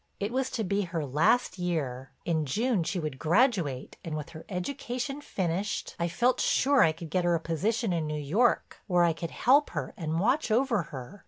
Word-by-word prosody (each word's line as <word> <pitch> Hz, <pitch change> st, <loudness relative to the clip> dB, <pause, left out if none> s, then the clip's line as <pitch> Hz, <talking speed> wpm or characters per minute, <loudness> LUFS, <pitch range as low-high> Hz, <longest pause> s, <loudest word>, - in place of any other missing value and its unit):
It 205 Hz, +2 st, -2 dB
was 260 Hz, +1 st, 0 dB
to 225 Hz, -, 0 dB
be 200 Hz, +1 st, 0 dB
her 170 Hz, -5 st, -3 dB
last 160 Hz, -, +2 dB
year; 135 Hz, -8 st, -2 dB, 0.2 s
in 160 Hz, -2 st, +1 dB
June 225 Hz, -, +1 dB
she 185 Hz, -, -2 dB
would 150 Hz, -5 st, -4 dB
graduate 170 Hz, -, +1 dB
and 155 Hz, -2 st, -4 dB
with 150 Hz, +2 st, -6 dB
her 160 Hz, -1 st, -10 dB
education 250 Hz, +8 st, -4 dB
finished, 190 Hz, -, -2 dB
I 170 Hz, -, +1 dB
felt 245 Hz, +8 st, +1 dB
sure 275 Hz, 0 st, +3 dB
I 160 Hz, -, +6 dB
could 160 Hz, 0 st, -9 dB
get 185 Hz, 0 st, +1 dB
her 175 Hz, 0 st, +3 dB
a -, -, 0 dB
position 195 Hz, +6 st, -1 dB
in 160 Hz, -2 st, -1 dB
New 150 Hz, 0 st, -3 dB
York 200 Hz, -, +1 dB
where 180 Hz, -3 st, +3 dB
I 170 Hz, -1 st, +3 dB
could 165 Hz, +1 st, -5 dB
help 280 Hz, -, +3 dB
her -, -, -3 dB
and 160 Hz, -1 st, -2 dB
watch 250 Hz, -, +1 dB
over 230 Hz, -1 st, +2 dB
her. 135 Hz, +7 st, -8 dB
180 Hz, 200 wpm, -28 LUFS, 160-235 Hz, 0.2 s, I